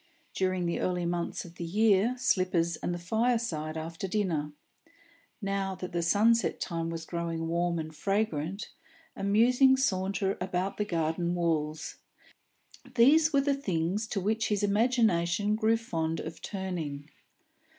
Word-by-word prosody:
During 185 -1 0
the 170 - -1
early 180 -1 -1
months 170 +1 -2
of 175 0 -13
the - - -5
year, 210 +5 +3
slippers 185 -8 +1
and - - -3
the 175 - -2
fireside 185 -5 -1
after 165 +4 -5
dinner; 175 -7 -1 0.9
now 195 -1 -1
that 180 -1 -6
the 170 - -1
sunset 220 +7 +3
time 165 -2 -3
was 165 -1 -5
growing 165 -1 -3
warm 170 +1 0
and 155 -1 -5
fragrant, 195 0 -1 0.5
a - - -6
musing 245 +6 +5
saunter 195 -5 0
about 185 +1 -2
the 210 - 0
garden 170 -1 -1
walks; 155 -3 -1 1.0
these 305 +7 +6
were 280 -2 +4
the 280 0 +1
things 195 -4 -1
to 210 - -2
which 220 +4 0
his 210 -1 0
imagination 205 -3 +2
grew 220 +1 +2
fond 165 -7 -2
of - - -7
turning. 170 -8 -4
185 Hz, 140 wpm, -29 LUFS, 170-215 Hz, 1.0 s, these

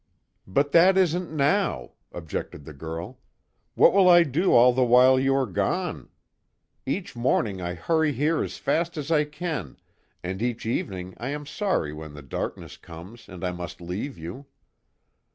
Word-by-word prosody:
"But 140 +9 +1
that 185 +3 +6
isn't 180 -2 +1
now," 150 - 0 0.2
objected 80 -3 -6
the 80 - -9
girl, 80 - -7 0.6
"What - - +6
will 190 -2 +5
I 175 -1 +8
do 165 +5 0
all 125 +1 +6
the 130 +1 +2
while 125 +2 +5
you 135 +1 +2
are 135 -1 +2
gone? 110 - -2 0.8
Each 180 +4 -3
morning 115 -5 0
I 90 0 -4
hurry 160 - +1
here 150 +4 0
as - - -6
fast 165 +4 -1
as 150 +1 -4
I 150 -2 +3
can, 150 - -5 0.5
and 95 +3 -4
each 120 -1 -2
evening 95 -5 -3
I 120 +4 -4
am 145 +1 -5
sorry 150 - -1
when 75 -1 -9
the 75 - -10
darkness 65 - -6
comes 90 +8 -12
and 90 -1 -10
I 90 - -1
must 90 -2 -7
leave 90 +11 -5
you." 90 - -8
125 Hz, 165 wpm, -25 LUFS, -, 0.8 s, I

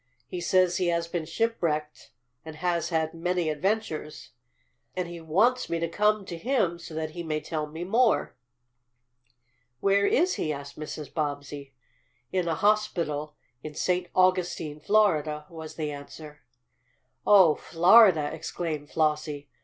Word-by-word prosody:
He 180 - -5
says 185 0 +3
he 180 - 0
has 170 -1 0
been 170 -2 -4
shipwrecked 165 -7 -2 0.3
and 160 -1 -9
has 170 0 -1
had 160 -2 0
many 175 0 -1
adventures, 165 -2 -3 0.6
and 180 -1 -2
he 170 -1 -8
wants 210 +11 +2
me 170 - 0
to 170 - -1
come 210 +3 +1
to 170 -2 -7
him 205 -7 0
so 165 -2 -10
that 155 0 -3
he 170 - -6
may 155 -2 -2
tell 155 0 -4
me 160 +3 -7
more." 225 +5 +2 1.4
"Where 200 +3 +3
is 355 - +2
he?" 155 - -1
asked 140 -1 -7
Mrs. 150 -1 -7
Bobbsey. 145 -2 -4 0.6
"In 180 -2 0
a 165 - 0
hospital 165 -7 0 0.3
in 155 -1 -8
St. 180 +2 0
Augustine, 180 -5 +1
Florida," 155 -7 +2
was 160 -2 -9
the 155 -2 -3
answer. 150 +1 -10 0.9
"Oh, 190 -6 +7
Florida!" 175 -2 +5
exclaimed 160 -2 -5
Flossie. 150 -2 -1
165 Hz, 140 wpm, -27 LUFS, 155-185 Hz, 1.4 s, Oh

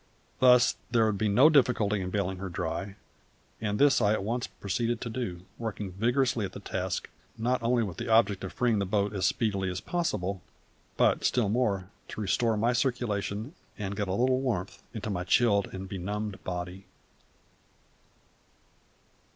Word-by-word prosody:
Thus 125 -1 +6
there 115 -2 +3
would 105 -3 0
be 110 - +2
no 120 +9 +6
difficulty 115 -9 +3
in 90 - -3
baling 95 -1 -2
her 95 0 -4
dry; 90 +3 -4 0.7
and 105 -1 -1
this 140 -2 +5
I 105 -1 +4
at 110 - -1
once 120 +4 -2
proceeded 115 +4 -2
to 115 - -4
do, 95 -7 -4
working 105 -4 -4
vigorously 120 +4 +1
at 95 -2 -4
the - - -7
task, - - -3 0.3
not 125 +3 0
only 120 0 +2
with 95 -5 -5
the - - -4
object 110 -4 +3
of 95 - -4
freeing 120 -4 +1
the 100 - -1
boat 100 +1 0
as 95 -3 +1
speedily 100 -4 0
as 90 0 -3
possible, 100 - -2 0.6
but, - - +3
still 120 -5 +2
more, 100 -5 0 0.2
to - - -8
restore 110 +2 +1
my 115 +4 +2
circulation 120 -1 -1 0.2
and 100 -1 -4
get 100 -1 -2
a 95 - -1
little 130 +4 +2
warmth 105 -8 -2
into 105 -2 -4
my 90 -2 -2
chilled 100 +1 +3
and 95 0 -6
benumbed 100 +1 -4
body. 90 +1 -5
105 Hz, 165 wpm, -29 LUFS, 95-120 Hz, 0.7 s, Thus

